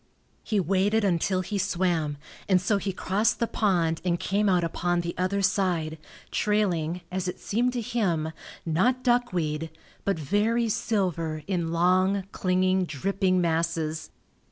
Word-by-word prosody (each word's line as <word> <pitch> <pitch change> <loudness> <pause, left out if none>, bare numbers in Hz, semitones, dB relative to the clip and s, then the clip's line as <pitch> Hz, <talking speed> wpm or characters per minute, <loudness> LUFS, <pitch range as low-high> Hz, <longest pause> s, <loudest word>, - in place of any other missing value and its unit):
He 215 -2 0
waded 195 +5 +2
until 185 0 +1
he 200 +2 -3
swam, 170 -5 0 0.3
and 185 -2 +5
so 200 +3 +1
he 195 - -2
crossed 195 +4 0
the 235 - +2
pond 175 -8 +1
and 175 -1 0
came 205 +1 +1
out 180 -2 +3
upon 175 +1 0
the 170 0 -4
other 190 +2 0
side, 175 -5 0 0.3
trailing, 180 -5 0
as 185 0 -2
it 180 - -4
seemed 245 +4 0
to 245 - -2
him, 190 -10 -1 0.3
not 235 +11 +1
duckweed, 175 - 0 0.3
but 200 -3 0
very 215 - +1
silver 170 -8 -1
in 175 -4 -1
long, 185 +3 +2
clinging, 185 0 +1
dripping 185 +4 0
masses. 160 -1 -1
185 Hz, 140 wpm, -26 LUFS, 170-200 Hz, 0.3 s, and